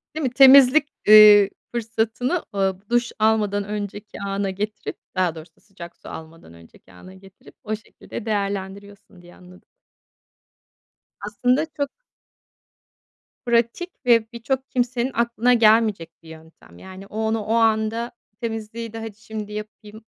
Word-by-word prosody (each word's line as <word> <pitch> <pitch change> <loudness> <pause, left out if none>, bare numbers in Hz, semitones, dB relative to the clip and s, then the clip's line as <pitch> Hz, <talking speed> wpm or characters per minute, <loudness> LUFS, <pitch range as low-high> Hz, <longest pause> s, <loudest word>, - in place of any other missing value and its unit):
Değil 315 - -3
mi? 260 - +1
Temizlik, 270 +3 +7 0.2
ııı, 210 -2 +9 0.2
fırsatını, 230 +6 -2
aaa, 195 0 -2
duş 240 0 +1
almadan 210 -2 +1
önceki 205 0 -7
ana 195 0 -2
getirip, 210 +3 -5 0.2
daha 180 -3 0
doğrusu 160 +2 -14
sıcak 175 -4 -13
su - - -13
almadan 160 - -11
önceki 85 +2 -19
ana 185 - -14
getirip 190 0 -18
o 215 0 -3
şekilde 215 0 -11
değerlendiriyorsun 200 -2 -5
diye 175 0 -17
anladım. 180 0 -18 1.6
Aslında 245 +8 0
çok 285 -1 -1 1.6
pratik 235 +9 0 0.2
ve 230 -1 +3
birçok 260 +3 -3
kimsenin 245 +1 -1
aklına 235 +1 +1
gelmeyecek 215 -7 +3
bir 160 - -15
yöntem, 160 - -16
yani 190 +1 -12
o 210 - -10
onu 220 0 0
o 220 - -2
anda 225 +1 +1 0.3
temizliği 225 0 -6
de 225 - -6
hadi 225 -2 -8
şimdi 215 -2 -8
yapayım 210 +1 -9
215 Hz, 130 wpm, -22 LUFS, 195-235 Hz, 1.6 s, ııı